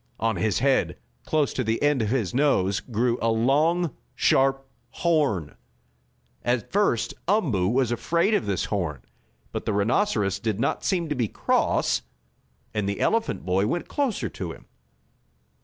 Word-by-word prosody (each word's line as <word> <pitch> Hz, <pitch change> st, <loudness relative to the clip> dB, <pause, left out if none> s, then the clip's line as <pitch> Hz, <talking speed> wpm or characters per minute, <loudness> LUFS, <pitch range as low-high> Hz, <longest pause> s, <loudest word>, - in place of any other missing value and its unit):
On 115 Hz, 0 st, +1 dB
his 110 Hz, -2 st, 0 dB
head, 135 Hz, +1 st, +1 dB, 0.3 s
close 155 Hz, -2 st, +1 dB
to 130 Hz, -, -1 dB
the 110 Hz, 0 st, 0 dB
end 145 Hz, -3 st, +3 dB
of 110 Hz, -, 0 dB
his 115 Hz, -6 st, 0 dB
nose, 120 Hz, -9 st, +2 dB
grew 120 Hz, +1 st, -1 dB
a 115 Hz, -, +2 dB
long, 145 Hz, +8 st, +2 dB, 0.2 s
sharp 135 Hz, +2 st, +2 dB, 0.2 s
horn. 135 Hz, -, 0 dB, 0.9 s
At 120 Hz, -2 st, -1 dB
first 120 Hz, -, +1 dB
Umboo 145 Hz, -, +2 dB
was 125 Hz, +2 st, +1 dB
afraid 170 Hz, -, +1 dB
of 205 Hz, -, +1 dB
this 100 Hz, -2 st, 0 dB
horn, 85 Hz, -, -3 dB, 0.5 s
but -, -, -5 dB
the 110 Hz, -, +1 dB
rhinoceros 105 Hz, -, +1 dB
did 110 Hz, -3 st, -2 dB
not 135 Hz, -, 0 dB
seem 175 Hz, -4 st, 0 dB
to -, -, +1 dB
be 120 Hz, -4 st, 0 dB
cross, -, -, +1 dB, 0.7 s
and 105 Hz, -2 st, -1 dB
the 100 Hz, -, -3 dB
elephant 225 Hz, 0 st, 0 dB
boy 95 Hz, +2 st, +1 dB
went 175 Hz, +9 st, -2 dB
closer 275 Hz, -7 st, -1 dB
to 90 Hz, -3 st, -6 dB
him. -, -, -12 dB
120 Hz, 155 wpm, -25 LUFS, 105-150 Hz, 0.9 s, end